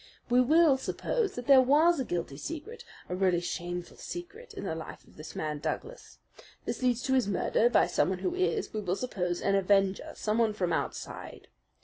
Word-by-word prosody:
"We 250 Hz, +1 st, +6 dB
will 305 Hz, +1 st, +5 dB
suppose 445 Hz, -, -1 dB
that 245 Hz, -, -6 dB
there 270 Hz, -1 st, +8 dB
was 300 Hz, +6 st, +4 dB
a -, -, +1 dB
guilty 170 Hz, -, -3 dB
secret, 330 Hz, -, -7 dB, 0.2 s
a -, -, -4 dB
really 185 Hz, -2 st, +2 dB
shameful 175 Hz, 0 st, -5 dB
secret 430 Hz, +8 st, -8 dB
in 390 Hz, -, -6 dB
the -, -, -2 dB
life 160 Hz, 0 st, -8 dB
of -, -, -21 dB
this 155 Hz, 0 st, -10 dB
man 150 Hz, -1 st, -3 dB
Douglas. -, -, -5 dB, 0.5 s
This -, -, -3 dB
leads 250 Hz, -1 st, +1 dB
to 265 Hz, -, 0 dB
his 255 Hz, -6 st, +3 dB
murder 480 Hz, -, +2 dB
by -, -, +4 dB
someone -, -, +1 dB
who 360 Hz, -, -2 dB
is, 380 Hz, +3 st, -1 dB
we 215 Hz, -, -2 dB
will 185 Hz, -2 st, -1 dB
suppose, 180 Hz, -7 st, -3 dB
an 200 Hz, -, +2 dB
avenger, 195 Hz, 0 st, +2 dB
someone 220 Hz, 0 st, +1 dB
from 180 Hz, -5 st, -1 dB
outside. -, -, -5 dB
240 Hz, 190 wpm, -29 LUFS, -, 0.5 s, there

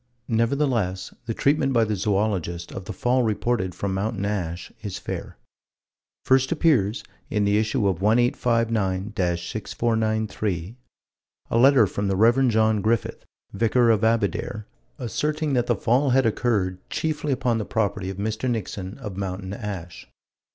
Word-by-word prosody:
Nevertheless, 115 Hz, -5 st, 0 dB
the 115 Hz, -, -2 dB
treatment 140 Hz, -1 st, +2 dB
by 115 Hz, -2 st, +4 dB
the 105 Hz, -1 st, -1 dB
Zoologist 95 Hz, -4 st, -1 dB
of 95 Hz, -, -7 dB
the -, -, -5 dB
fall 125 Hz, +1 st, +1 dB
reported 110 Hz, -4 st, 0 dB
from 100 Hz, 0 st, -2 dB
Mountain 100 Hz, +1 st, -2 dB
Ash 90 Hz, -4 st, -3 dB
is 100 Hz, -3 st, -5 dB
fair. -, -, -6 dB, 0.9 s
First 130 Hz, 0 st, +3 dB
appears, 130 Hz, -, +2 dB, 0.3 s
in 105 Hz, -2 st, +1 dB
the 100 Hz, +1 st, +3 dB
issue 110 Hz, 0 st, +1 dB
of 95 Hz, -2 st, -1 dB
1859 115 Hz, -3 st, +1 dB, 0.2 s
6493, 110 Hz, -1 st, -2 dB, 0.8 s
a -, -, +2 dB
letter 130 Hz, -2 st, +6 dB
from 100 Hz, +1 st, -2 dB
the 95 Hz, -, +1 dB
Rev. 120 Hz, +6 st, +4 dB
John 110 Hz, -2 st, +3 dB
Griffith, 110 Hz, +1 st, -1 dB, 0.3 s
Vicar 115 Hz, +3 st, +3 dB
of 110 Hz, -1 st, +1 dB
Abedare, 110 Hz, -1 st, 0 dB, 0.3 s
asserting 150 Hz, +4 st, -1 dB
that 120 Hz, -2 st, +1 dB
the -, -, +2 dB
fall 130 Hz, +4 st, +2 dB
had 130 Hz, 0 st, +3 dB
occurred, 105 Hz, -5 st, 0 dB
chiefly 155 Hz, -2 st, -2 dB
upon 125 Hz, -3 st, +1 dB
the -, -, -1 dB
property 100 Hz, -3 st, -1 dB
of 95 Hz, -, -6 dB
Mr. 110 Hz, +5 st, -2 dB
Nixon, 100 Hz, -3 st, -4 dB
of 105 Hz, -8 st, -7 dB
Mountain 95 Hz, 0 st, -4 dB
Ash. 95 Hz, -6 st, -7 dB
110 Hz, 145 wpm, -24 LUFS, 100-120 Hz, 0.9 s, letter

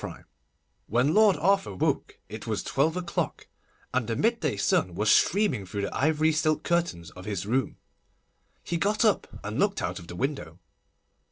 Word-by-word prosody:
CHAPTER -, -, -6 dB
III -, -, -20 dB, 0.6 s
WHEN 125 Hz, +7 st, +2 dB
Lord 215 Hz, -2 st, +5 dB
Arthur 195 Hz, -, +1 dB
woke -, -, -1 dB
it -, -, -8 dB
was -, -, -2 dB
twelve 160 Hz, +5 st, +1 dB
o'clock, 175 Hz, -1 st, -3 dB, 0.5 s
and 125 Hz, -3 st, 0 dB
the 115 Hz, -, -1 dB
midday 215 Hz, -, 0 dB
sun 90 Hz, -3 st, +1 dB
was 105 Hz, +3 st, +2 dB
streaming 180 Hz, -, +3 dB
through 100 Hz, +2 st, -4 dB
the -, -, -4 dB
ivory 155 Hz, +2 st, +2 dB
silk 155 Hz, 0 st, +1 dB
curtains 170 Hz, -, -1 dB
of 90 Hz, 0 st, -11 dB
his 100 Hz, -3 st, -3 dB
room. 125 Hz, +5 st, -1 dB, 0.9 s
He 170 Hz, -, -2 dB
got 210 Hz, +6 st, +1 dB
up 215 Hz, -, +2 dB, 0.2 s
and 105 Hz, +5 st, -4 dB
looked 200 Hz, 0 st, +2 dB
out -, -, -3 dB
of 85 Hz, -, -12 dB
the 90 Hz, -, -8 dB
window. 135 Hz, -, -3 dB
145 Hz, 175 wpm, -27 LUFS, -, 0.9 s, Lord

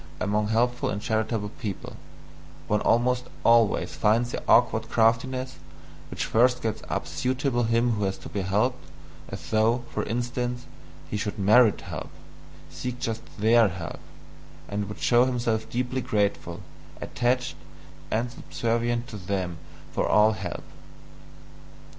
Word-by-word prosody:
Among 105 Hz, 0 st, 0 dB
helpful 120 Hz, +3 st, +1 dB
and 100 Hz, -, -2 dB
charitable 110 Hz, -1 st, -1 dB
people, 105 Hz, -6 st, -5 dB, 0.7 s
one 105 Hz, 0 st, +1 dB
almost 125 Hz, +1 st, +2 dB, 0.2 s
always 115 Hz, -2 st, +4 dB
finds 115 Hz, +3 st, +2 dB
the -, -, -3 dB
awkward 115 Hz, -1 st, +4 dB
craftiness 130 Hz, +3 st, +1 dB, 0.5 s
which -, -, -3 dB
first 125 Hz, +2 st, +3 dB
gets 110 Hz, -2 st, -2 dB
up -, -, -2 dB
suitably 130 Hz, -1 st, 0 dB
him 115 Hz, +1 st, +2 dB
who 105 Hz, -3 st, 0 dB
has 95 Hz, 0 st, -2 dB
to -, -, -10 dB
be 100 Hz, -, -2 dB
helped, 105 Hz, +7 st, 0 dB, 0.5 s
as -, -, -7 dB
though, 115 Hz, +3 st, +3 dB
for -, -, 0 dB
instance, 120 Hz, +2 st, -2 dB, 0.5 s
he 105 Hz, -, -1 dB
should 105 Hz, 0 st, -3 dB
"merit" 105 Hz, +2 st, +5 dB
help, -, -, -6 dB, 0.6 s
seek 120 Hz, +10 st, -5 dB
just 115 Hz, -2 st, -2 dB, 0.2 s
THEIR 110 Hz, +2 st, +5 dB
help, 90 Hz, -3 st, -6 dB, 0.7 s
and 100 Hz, 0 st, -3 dB
would 105 Hz, -, -7 dB
show 120 Hz, 0 st, +4 dB
himself 120 Hz, -3 st, -1 dB
deeply 125 Hz, +1 st, -1 dB
grateful, 105 Hz, -5 st, -1 dB, 0.4 s
attached, 125 Hz, +1 st, -1 dB, 0.5 s
and 120 Hz, +2 st, -1 dB
subservient 120 Hz, 0 st, -1 dB
to 110 Hz, -, -7 dB
them 90 Hz, -3 st, -3 dB, 0.3 s
for -, -, 0 dB
all 105 Hz, +1 st, +5 dB
help. 95 Hz, -5 st, -5 dB
115 Hz, 135 wpm, -26 LUFS, 105-125 Hz, 0.7 s, merit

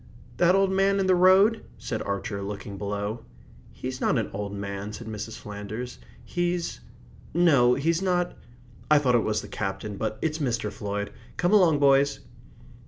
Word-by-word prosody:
"That 180 Hz, +1 st, +4 dB
old 195 Hz, 0 st, +3 dB
man 195 Hz, +1 st, +2 dB
in 195 Hz, -, +1 dB
the 185 Hz, -, +4 dB
road?" 190 Hz, +5 st, +5 dB
said 110 Hz, -, -4 dB
Archer, 100 Hz, 0 st, -3 dB
looking 100 Hz, 0 st, -6 dB
below. 105 Hz, +3 st, -4 dB, 0.5 s
"He's 130 Hz, 0 st, -6 dB
not -, -, +2 dB
an 115 Hz, -, -2 dB
old 100 Hz, 0 st, -4 dB
man," 100 Hz, 0 st, -5 dB
said 115 Hz, -, -8 dB
Mrs. 110 Hz, 0 st, -6 dB
Flanders. 105 Hz, -, -7 dB, 0.3 s
"He's 175 Hz, -1 st, -2 dB, 0.6 s
no, 140 Hz, -8 st, +5 dB
he's 165 Hz, +5 st, +1 dB
not 180 Hz, -2 st, 0 dB, 0.5 s
I 150 Hz, -, +7 dB
thought 135 Hz, -4 st, +2 dB
it 120 Hz, -, +5 dB
was 110 Hz, -1 st, -1 dB
the -, -, -8 dB
Captain, 100 Hz, 0 st, -4 dB
but 110 Hz, +1 st, -2 dB
it's 160 Hz, 0 st, -1 dB
Mr. 120 Hz, -7 st, -1 dB
Floyd. 105 Hz, 0 st, -4 dB, 0.3 s
Come 180 Hz, +3 st, +2 dB
along, 175 Hz, -7 st, +5 dB
boys." 140 Hz, 0 st, +3 dB
125 Hz, 165 wpm, -26 LUFS, -, 0.6 s, I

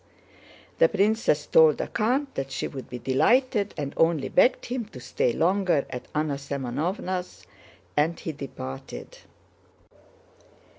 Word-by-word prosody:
The -, -, +6 dB
princess 205 Hz, -7 st, +2 dB
told 155 Hz, -2 st, +6 dB
the -, -, -2 dB
count 260 Hz, +6 st, 0 dB
that 135 Hz, 0 st, -3 dB
she -, -, -2 dB
would 135 Hz, -2 st, -8 dB
be 125 Hz, -, -5 dB
delighted, 205 Hz, -, +2 dB
and 145 Hz, -1 st, -3 dB
only 160 Hz, -5 st, +2 dB
begged 250 Hz, -, +3 dB
him 245 Hz, -1 st, -3 dB
to 135 Hz, -, -12 dB
stay 120 Hz, -, 0 dB
longer 175 Hz, 0 st, +2 dB
at 125 Hz, -1 st, -6 dB
Anna 150 Hz, -2 st, 0 dB
Semënovna's, 140 Hz, -, -3 dB, 0.5 s
and 160 Hz, +3 st, +1 dB
he 160 Hz, -, -4 dB
departed. 65 Hz, -, -8 dB
155 Hz, 130 wpm, -26 LUFS, 135-205 Hz, 0.5 s, The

